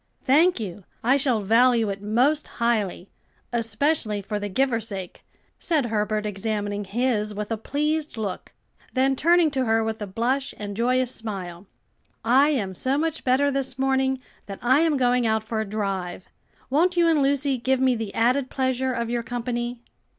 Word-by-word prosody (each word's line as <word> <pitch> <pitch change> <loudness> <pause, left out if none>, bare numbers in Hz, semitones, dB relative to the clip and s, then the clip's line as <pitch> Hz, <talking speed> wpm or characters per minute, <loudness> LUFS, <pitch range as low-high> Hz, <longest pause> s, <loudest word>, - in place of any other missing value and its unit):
"Thank 315 +4 +4
you, 200 -2 -6 0.2
I 255 +4 +4
shall 255 -6 +1
value 230 0 +4
it 195 0 -6
most 250 +9 +1
highly; 215 -6 -1 0.4
especially 230 0 0
for 210 +1 -3
the 205 0 -4
giver's 230 0 0
sake," 190 -4 -7 0.4
said 310 -6 +1
Herbert, 215 -1 -1
examining 205 0 -2
his 215 0 -1
with 210 +1 -5
a - - +1
pleased 300 +4 -2
look, 205 -4 -4 0.4
then 265 +1 +3
turning 335 +2 +4
to 265 -2 0
her 225 0 +2
with 220 0 -3
a 205 - -3
blush 250 +7 -1
and 205 -1 -6
joyous 250 +2 +1
smile, 190 -4 -6 0.6
"I 265 +5 +5
am 210 -11 -1
so 260 +9 0
much 320 +1 -1
better 270 +3 +3
this 270 -2 -2
morning 265 0 +1 0.3
that 195 -1 -6
I 260 +4 +4
am 320 -3 +2
going 245 -2 +2
out 220 0 +1
for 220 0 -2
a - - -2
drive. 195 -4 -3 0.4
Won't 350 +6 +2
you 340 -1 +5
and 320 -3 +3
Lucy 275 -1 +1
give 260 +2 +1
me 260 -1 +3
the 225 -4 -4
added 250 +3 +2
pleasure 260 0 0
of 235 -1 -2
your 240 -1 0
company?" 240 0 -4
240 Hz, 170 wpm, -24 LUFS, 210-270 Hz, 0.6 s, I